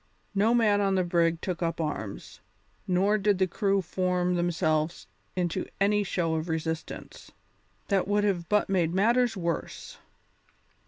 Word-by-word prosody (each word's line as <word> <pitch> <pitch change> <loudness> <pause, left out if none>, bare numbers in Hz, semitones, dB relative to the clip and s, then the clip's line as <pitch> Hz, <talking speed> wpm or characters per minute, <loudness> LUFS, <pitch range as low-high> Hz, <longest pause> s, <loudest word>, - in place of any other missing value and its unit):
No 215 +4 +3
man 210 -3 +3
on 195 -1 +2
the 185 - +2
brig 170 -1 +1
took 180 -2 -3
up 165 -1 -1
arms, 145 -11 -5 0.5
nor 195 +4 +2
did 205 -1 +2
the 190 - +3
crew 195 +1 0
form 180 0 0
themselves 165 -2 0 0.3
into 180 0 -1
any 205 +1 +3
show 170 -4 -1
of 160 +1 -2
resistance; 160 0 -5 0.6
that 195 -3 +1
would 205 0 +2
have 180 -5 -1
but 210 0 +2
made 180 -3 +1
matters 235 +3 +2
worse. 170 -3 -4
185 Hz, 145 wpm, -28 LUFS, 170-200 Hz, 0.6 s, No